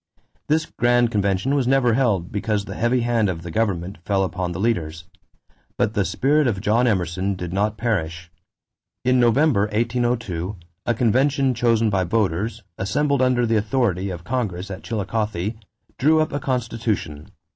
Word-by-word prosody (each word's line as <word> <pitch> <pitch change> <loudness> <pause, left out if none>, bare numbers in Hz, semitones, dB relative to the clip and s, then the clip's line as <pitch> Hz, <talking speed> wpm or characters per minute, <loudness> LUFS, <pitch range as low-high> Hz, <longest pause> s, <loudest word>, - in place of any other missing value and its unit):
This 155 +1 +2
grand 120 -2 +2
convention 100 +4 0
was 135 -4 +1
never 130 -3 +3
held 110 -9 +1
because 105 0 -1
the 100 - -6
heavy 120 +4 +1
hand 115 -3 +1
of 85 -2 -4
the 85 - -6
government 95 -3 -1
fell 95 +1 +1
upon 90 -1 -2
the 85 - -5
leaders; 85 -7 -1 0.7
but 110 - +1
the 105 -3 +1
spirit 145 +8 +2
of 105 -5 0
John 115 +5 +2
Emerson 95 -1 0
did 90 -1 -5
not 105 +2 0
perish. 85 -7 -2 0.7
In 130 0 +4
November, 120 -2 +3
1802, 115 -4 -1 0.3
a 120 - +2
convention 130 +4 +2
chosen 115 -2 +2
by 95 -1 +1
voters, 105 +3 -1 0.2
assembled 140 +8 +1
under 125 -1 +3
the 115 -1 +2
authority 105 -4 0
of 85 -2 -6
Congress 100 -4 -3
at 95 - -6
Chillicothe, 105 -2 -2 0.5
drew 155 +4 +4
up 155 - 0
a 145 - -1
constitution. 115 - -2
110 Hz, 155 wpm, -22 LUFS, 95-120 Hz, 0.7 s, In